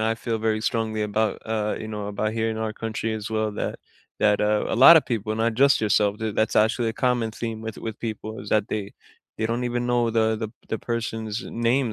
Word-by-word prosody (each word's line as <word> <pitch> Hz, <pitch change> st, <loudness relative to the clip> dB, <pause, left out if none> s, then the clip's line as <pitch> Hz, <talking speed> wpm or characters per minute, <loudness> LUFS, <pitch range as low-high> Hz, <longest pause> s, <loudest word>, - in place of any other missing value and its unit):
I 110 Hz, +1 st, +1 dB
feel 115 Hz, -1 st, -2 dB
very 110 Hz, 0 st, 0 dB
strongly 110 Hz, -1 st, -1 dB
about, 105 Hz, 0 st, 0 dB
uh, 110 Hz, -1 st, -1 dB
you 110 Hz, -, -6 dB
know, 105 Hz, -2 st, -4 dB
about 105 Hz, +1 st, -2 dB
here 115 Hz, 0 st, 0 dB
in 110 Hz, -, -4 dB
our 110 Hz, -1 st, -2 dB
country 110 Hz, 0 st, -3 dB
as 110 Hz, 0 st, -5 dB
well, 110 Hz, -1 st, 0 dB
that -, -, -3 dB, 0.4 s
that, 105 Hz, -1 st, +3 dB
uh, 105 Hz, 0 st, +2 dB
a -, -, -1 dB
lotta 160 Hz, +7 st, +9 dB
people, 110 Hz, -5 st, -3 dB
not 115 Hz, +1 st, 0 dB
just 140 Hz, +2 st, +4 dB
yourself, 105 Hz, -1 st, +2 dB
d 110 Hz, -1 st, -2 dB
that's 110 Hz, +1 st, 0 dB
actually 115 Hz, +2 st, +3 dB
a -, -, -2 dB
common 120 Hz, -3 st, +1 dB
theme 115 Hz, 0 st, -5 dB
with 110 Hz, -1 st, -6 dB
with 110 Hz, -1 st, -6 dB
people 110 Hz, -1 st, -5 dB
is 105 Hz, -, -9 dB
that 105 Hz, -1 st, +2 dB
they 105 Hz, -1 st, -4 dB, 0.5 s
they 110 Hz, -, 0 dB
don't 120 Hz, +2 st, -1 dB
even 120 Hz, 0 st, -1 dB
know 120 Hz, -1 st, +2 dB
the 110 Hz, -1 st, +2 dB
the 110 Hz, 0 st, -4 dB, 0.2 s
the 110 Hz, -, -2 dB
person's 110 Hz, -2 st, -3 dB
name 120 Hz, +1 st, 0 dB
110 Hz, 225 wpm, -24 LUFS, 110-115 Hz, 0.5 s, lotta